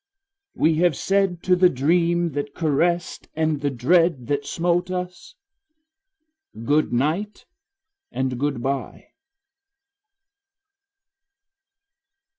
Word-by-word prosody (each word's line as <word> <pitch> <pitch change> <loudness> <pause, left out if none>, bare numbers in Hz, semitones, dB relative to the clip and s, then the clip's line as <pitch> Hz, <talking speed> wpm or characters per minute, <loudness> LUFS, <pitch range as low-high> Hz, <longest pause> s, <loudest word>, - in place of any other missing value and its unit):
We 160 -1 +2
have 175 -2 +3
said 195 -1 0
to 185 - +3
the 180 0 +5
dream 170 +5 +1
that 145 0 -5
caressed 170 +2 -1
and 155 -2 0
the 145 - 0
dread 140 +2 +2
that 145 -1 -1
smote 175 +1 0
us 180 -1 -6 1.3
Goodnight 155 - 0 0.7
and 130 -2 -2
goodbye. 135 -1 -3
160 Hz, 80 wpm, -23 LUFS, 140-175 Hz, 1.3 s, the